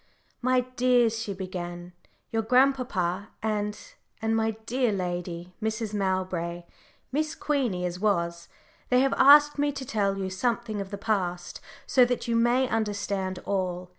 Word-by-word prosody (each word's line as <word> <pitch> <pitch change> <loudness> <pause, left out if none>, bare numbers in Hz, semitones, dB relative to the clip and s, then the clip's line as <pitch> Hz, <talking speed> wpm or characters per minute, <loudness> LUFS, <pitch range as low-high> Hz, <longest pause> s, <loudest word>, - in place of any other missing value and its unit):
"My 255 0 +3
dears," 245 -3 +3
she 215 - -4
began, 175 -2 -6 0.4
"your 225 - +1
dear 220 - -13
grandpapa 245 -8 +2
and 210 -1 -1 0.4
and 225 0 0
my 225 -1 0
dear 250 0 +1
lady, 180 -2 -4
Mrs. 220 0 -2
Mowbray, 185 -3 -2 0.5
Miss 305 +3 -1
Queenie 245 -12 -1
as 180 0 -4
was 170 -4 0 0.4
they 250 0 +4
have 270 0 +2
asked 295 +2 +7
me 290 0 +2
to 270 -1 -6
tell 200 -4 0
you 190 -1 -3
something 225 +1 -1
of 195 - -6
the 200 - -5
past, 185 -5 -2 0.2
so 255 - +5
that 245 0 -2
you 235 - +1
may 240 +3 +3
understand 200 -4 -2
all. 185 -2 -2
210 Hz, 150 wpm, -27 LUFS, 185-245 Hz, 0.5 s, asked